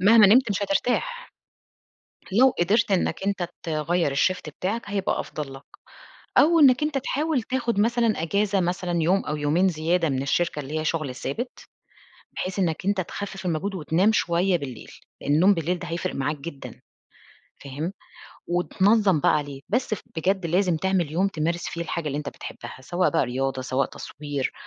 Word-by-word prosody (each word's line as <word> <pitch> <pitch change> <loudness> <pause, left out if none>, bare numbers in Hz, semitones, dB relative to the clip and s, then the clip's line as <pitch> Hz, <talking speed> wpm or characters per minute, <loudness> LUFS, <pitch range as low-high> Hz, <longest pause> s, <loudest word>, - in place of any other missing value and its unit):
مهما 210 +2 +7
نمت 235 +3 +5
مش 200 0 -1
هترتاح. 485 - -1 1.0
لو 255 +6 +6
قدرت 205 +5 +2
إنّك 190 0 0
أنت 190 -4 -1
تغيّر 160 -1 0
الShift 180 +2 +1
بتاعك، 215 +6 -1
هيبقى 200 -1 -1
أفضل 145 -3 -6
لك. 135 - -11 0.8
أو 330 +2 +6
إنّك 265 0 +6
أنت 300 -2 +1
تحاول 285 0 -1
تاخُد 235 -4 -1
مثلًا 230 -4 +2
إجازة 200 +3 +1
مثلًا 175 -1 -1
يوم 190 +4 +2
أو 150 - -2
يومين 150 +6 +2
زيادة 165 0 +1
من 135 -1 -1
الشركة 150 +2 0
اللي 150 +3 -4
هي - - -4
شُغل 155 -5 -1
ثابت، 235 - -5 0.8
بحيث 185 +1 -3
إنّك 175 -1 -1
أنت 200 -1 +2
تخفِّف 190 +1 -6
المجهود 180 +4 -1
وتنام 180 +5 +2
شوية 175 -1 +2
بالليل، 130 -6 -8 0.3
النوم 165 +8 +4
بالليل 170 +2 -1
ده 175 0 -7
هيفرق 170 +2 -3
معاك 145 +3 -1
جدًا. 140 -1 -9 0.8
فاهم؟ 150 +7 -4 0.6
وتنظّم 190 0 +3
بقى - - +4
عليه. 145 -2 -5
بس 235 +1 0
ف - - -10
بجد 185 +2 0
لازم 180 0 +2
تعمل 180 -3 0
يوم 190 +4 +2
تمارس 170 -1 -2
فيه 170 - -6
الحاجة 170 -1 -4
اللي 145 +1 -2
أنت 145 - -4
بتحبّها، - - -9
سواء 175 +6 0
بقى 165 - +2
رياضة، 130 +1 -2
سواء 130 +1 0
تصوير، 145 -2 -5
175 Hz, 165 wpm, -25 LUFS, 155-200 Hz, 1.0 s, مهما